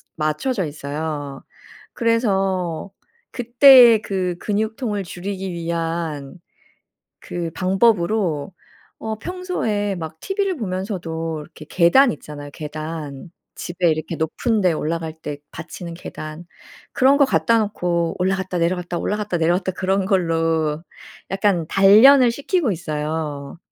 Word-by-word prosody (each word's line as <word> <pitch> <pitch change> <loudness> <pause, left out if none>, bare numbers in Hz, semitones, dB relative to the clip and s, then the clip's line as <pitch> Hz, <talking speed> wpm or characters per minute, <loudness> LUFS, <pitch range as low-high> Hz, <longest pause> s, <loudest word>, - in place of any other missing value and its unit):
맞춰져 165 - -1
있어요. 145 -1 -5 0.5
그래서 195 -7 0 0.4
그때의 245 -2 +7
그 185 -4 -2
근육통을 215 0 -2
줄이기 190 +2 -5
위한 165 -3 -3 0.8
그 170 -2 -5
방법으로 190 -4 +1 0.5
어 220 -1 -4
평소에 225 - -2
막 160 -2 -7
TV를 390 -1 -1
보면서도 180 - -4
이렇게 150 0 -13
계단 215 +10 +5
있잖아요, 145 -1 -9
계단. 155 0 -7 0.2
집에 175 0 -1
이렇게 155 +1 -3
높은 205 +8 0
데 180 -2 +3
올라갈 160 0 -3
때 145 -2 -5
받치는 170 +1 -8
계단. 155 -1 -8 0.5
그런 270 +2 +4
거 280 - +5
갖다 230 -3 +2
놓고 175 -5 -1
올라갔다 185 0 -1
내려갔다 175 +1 -1
올라갔다 210 -1 -2
내려갔다 175 +3 +1
그런 190 +1 0
걸로 165 -4 0 0.5
약간 195 -4 +1
단련을 235 +8 +7
시키고 285 - 0
있어요. 150 -3 -4
180 Hz, 265 characters per minute, -21 LUFS, 160-210 Hz, 0.8 s, 그때의